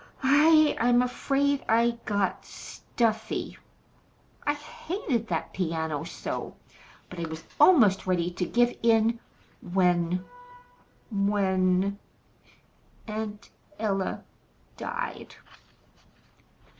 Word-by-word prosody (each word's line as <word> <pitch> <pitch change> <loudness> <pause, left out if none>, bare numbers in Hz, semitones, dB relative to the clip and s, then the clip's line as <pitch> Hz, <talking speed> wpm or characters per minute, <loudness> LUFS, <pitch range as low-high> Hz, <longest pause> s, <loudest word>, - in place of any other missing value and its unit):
I 305 +3 +5
I'm 245 +1 +4
afraid 275 +2 0
I 235 +1 +3
got 200 -3 -1
stuffy. 220 -2 -3 0.9
I 290 - +3
hated 295 - -4
that 165 -5 -3
piano 160 -4 -2
so! - - -5 0.5
But 180 - -9
I 165 - -3
was 160 0 -7 0.2
almost 230 - +5
ready 180 -1 +1
to 180 +1 -2
give 240 0 +2
in 230 0 +3 0.4
when 180 -1 +1 0.9
when 195 -1 +1 1.1
Aunt 215 -1 -6 0.3
Ella 195 -3 -2 0.5
died." 480 0 -5
215 Hz, 85 wpm, -27 LUFS, 185-245 Hz, 1.1 s, I